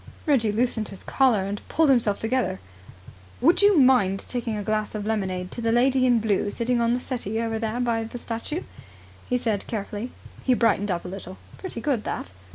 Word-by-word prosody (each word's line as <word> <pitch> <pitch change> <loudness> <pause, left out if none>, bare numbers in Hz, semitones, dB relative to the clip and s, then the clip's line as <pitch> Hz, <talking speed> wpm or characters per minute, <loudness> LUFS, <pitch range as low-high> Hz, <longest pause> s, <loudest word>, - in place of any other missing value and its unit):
Reggie 255 -9 +3
loosened 225 -1 0
his 195 - -10
collar, 245 -8 +2
and 200 +1 -4
pulled 315 -3 +4
himself 225 -6 +2
together. 230 - -1 0.8
"Would 335 +10 +4
you 405 -2 +6
mind 250 -8 +4
taking 235 -3 -2
a 205 - -3
glass 215 +1 -1
of 210 -1 -3
lemonade 185 -4 -2
to 235 - -6
the 230 0 +1
lady 255 +2 +3
in 240 -2 +4
blue 205 -2 +1
sitting 235 +3 0
on 235 +1 +2
the - - -1
settee 225 -4 -3
over 225 -1 -1
there 225 +1 -2
by 230 -2 0
the 230 - -7
statue," 235 +8 -4 0.7
he 250 - +2
said 220 -5 -2
carefully. 210 +1 -4 0.3
He 255 - +3
brightened 215 -3 +2
up 175 -1 -2
a - - -4
little. 185 0 -8 0.2
"Pretty 365 -11 -5
good 255 -6 0
that! 90 - -4
230 Hz, 195 wpm, -25 LUFS, 205-250 Hz, 0.8 s, you